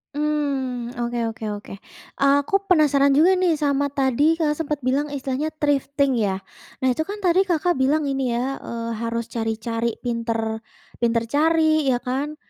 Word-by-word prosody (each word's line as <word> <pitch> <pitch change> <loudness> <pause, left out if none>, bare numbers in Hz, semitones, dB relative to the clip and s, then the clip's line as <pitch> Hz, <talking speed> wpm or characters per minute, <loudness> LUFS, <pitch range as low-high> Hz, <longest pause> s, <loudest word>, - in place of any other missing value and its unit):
Mmm, 275 -5 -1
oke 240 0 -2
oke 225 0 -8
oke. 205 - -10 0.5
Aku 280 +7 +3
penasaran 285 -5 +4
juga 330 +6 +5
nih 355 -3 +3
sama 285 -1 +1
tadi 280 +3 +2
Kakak 305 -2 0
sempat 300 -2 -2
bilang 270 +4 +1
istilahnya 285 +2 -3
thrifting 280 -3 +1
ya. 200 -3 +1 0.5
Nah 260 - +4
itu 315 +6 -2
kan 410 +1 -6
tadi 370 +2 +3
Kakak 345 -2 +1
bilang 290 +4 +2
ini 270 -4 -1
ya, 260 +3 -2
eee, 230 0 -5
harus 230 0 -3
cari-cari 230 0 -2
pintar 230 -2 -2 0.4
pintar 230 -1 +1
cari 315 0 +3
ya 255 - +3
kan, 275 +4 -2
275 Hz, 155 wpm, -23 LUFS, 240-300 Hz, 0.5 s, juga